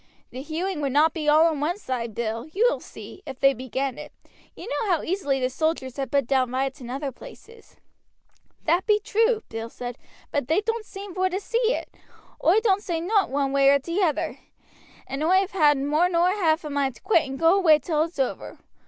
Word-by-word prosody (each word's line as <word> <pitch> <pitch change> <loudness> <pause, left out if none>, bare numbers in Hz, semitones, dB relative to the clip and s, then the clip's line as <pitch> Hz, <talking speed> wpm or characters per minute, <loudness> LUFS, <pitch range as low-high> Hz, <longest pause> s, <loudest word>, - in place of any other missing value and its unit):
"The 255 - -7
hewing 325 +3 -3
would 275 -2 -1
not 310 +2 +4
be 305 -2 -1
all 310 +2 +6
on 320 -3 +1
one 325 +6 -1
side, 240 - -4
Bill, 230 +2 -3
you 430 +5 +2
will - - 0
see, 385 - -11
if 265 -2 -7
they 275 0 +5
begin 260 +1 -4
it. - - -9 0.4
You - - -9
know 455 -3 -2
how 345 -4 +1
easily 325 -7 -1
the 255 - +1
soldiers 280 -3 -2
have 270 -2 -3
put 280 -1 +1
down 260 0 +1
riots 265 +1 -2
in 240 - -8
other 275 +2 -3
places." 460 - -15 0.9
"That 345 +5 +1
be 420 -1 +4
true," 445 +2 +1
Bill 225 +1 -6
said; 245 0 -7 0.3
"but 285 -4 -1
they 325 +7 +2
doan't 450 0 -3
seem 390 -1 -8
vor 375 0 +1
to 375 +1 -2
see 465 +3 0
it. - - -7 0.5
Oi 360 +7 +5
don't 405 -3 +2
say 345 -5 -2
nowt 390 +4 +1
one 275 0 0
way 275 0 +4
or 280 - +6
t' 335 +8 -3
other, 325 -6 0 0.7
and 275 +3 -4
oi 360 +4 +4
have 385 +1 +1
had 300 -6 +4
more 300 +6 +1
nor 350 +1 +3
half 335 -5 +1
a 300 - -6
mind 275 -3 -1
to 220 - -17
quit 325 -9 +2
and 270 - -5
go 330 +3 +4
away 335 -6 +5
till 305 0 -1
it's 330 +1 -3
over. 265 -2 -3
315 Hz, 220 wpm, -24 LUFS, 270-380 Hz, 0.9 s, all